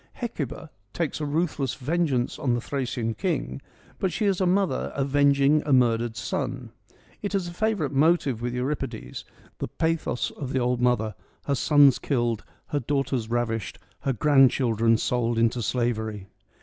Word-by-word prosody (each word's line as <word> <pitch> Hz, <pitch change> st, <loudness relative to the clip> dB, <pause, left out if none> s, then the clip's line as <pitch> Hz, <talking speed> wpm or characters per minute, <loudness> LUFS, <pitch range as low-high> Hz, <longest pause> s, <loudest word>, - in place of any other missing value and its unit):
Hecuba -, -, -5 dB, 0.2 s
takes 165 Hz, -2 st, -2 dB
a 150 Hz, -, -1 dB
ruthless 150 Hz, -3 st, -1 dB
vengeance 140 Hz, -3 st, -1 dB
on 125 Hz, -3 st, +1 dB
the -, -, 0 dB
Thracian 120 Hz, -3 st, -2 dB
king, 65 Hz, -, -2 dB, 0.4 s
but 190 Hz, -, 0 dB
she 210 Hz, -, -1 dB
is 195 Hz, -2 st, +1 dB
a 185 Hz, -, +3 dB
mother 185 Hz, -6 st, +1 dB
avenging 140 Hz, +1 st, +3 dB
a 150 Hz, -, -2 dB
murdered 120 Hz, -3 st, +3 dB
son. 125 Hz, +2 st, -3 dB, 0.5 s
It 205 Hz, -1 st, -2 dB
is 190 Hz, -3 st, 0 dB
a 175 Hz, -, -7 dB
favourite 210 Hz, -7 st, 0 dB
motive 140 Hz, -4 st, +2 dB
with 120 Hz, +1 st, -2 dB
Euripides; 130 Hz, -2 st, -4 dB, 0.3 s
the -, -, -2 dB
pathos 160 Hz, -6 st, -1 dB
of 135 Hz, -2 st, -6 dB
the 130 Hz, -, +2 dB
old 125 Hz, 0 st, 0 dB
mother, 115 Hz, -3 st, +1 dB, 0.3 s
her 140 Hz, -, 0 dB
sons 140 Hz, -1 st, +5 dB
killed, 120 Hz, -5 st, -1 dB, 0.3 s
her 145 Hz, -, 0 dB
daughters 135 Hz, -3 st, -1 dB
ravished, 115 Hz, -3 st, -2 dB, 0.2 s
her 135 Hz, -, -1 dB
grandchildren 120 Hz, -4 st, +4 dB
sold 120 Hz, 0 st, 0 dB
into 115 Hz, +1 st, +2 dB
slavery. 110 Hz, -4 st, -1 dB
130 Hz, 150 wpm, -26 LUFS, 120-150 Hz, 0.5 s, sons